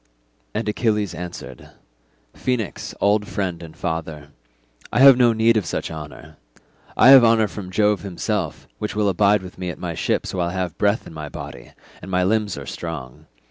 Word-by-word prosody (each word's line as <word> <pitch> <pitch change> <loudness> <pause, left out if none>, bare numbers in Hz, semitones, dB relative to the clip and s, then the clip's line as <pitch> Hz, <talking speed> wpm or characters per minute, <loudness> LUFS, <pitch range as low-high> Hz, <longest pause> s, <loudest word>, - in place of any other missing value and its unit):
And 110 0 -2
Achilles 105 -3 0
answered, 90 0 -8 0.6
"Phoenix, 125 -6 -3
old 105 +1 +2
friend 90 -4 -3
and 80 -2 -11
father, 80 -4 -4 0.6
I - - +1
have 135 -1 +10
no 120 -1 +4
need 115 0 +3
of 105 - 0
such - - -3
honour. 75 -1 -10 0.6
I - - +7
have 135 -2 +10
honour 115 -2 +4
from 100 -3 -8
Jove 105 +2 +2
himself, 95 - -3
which 105 - -4
will 105 -1 +2
abide 100 +1 +3
with 90 0 -11
me 90 -1 -3
at 85 - -6
my - - -4
ships - - -1
while 90 -2 -1
I - - -6
have 90 -4 -3
breath 105 +2 +1
in - - -11
my 75 -2 -7
body, - - -9 0.3
and - - -9
my 90 -1 +1
limbs 105 0 0
are - - -7
strong. 75 -7 -7
95 Hz, 180 wpm, -22 LUFS, 85-110 Hz, 0.6 s, have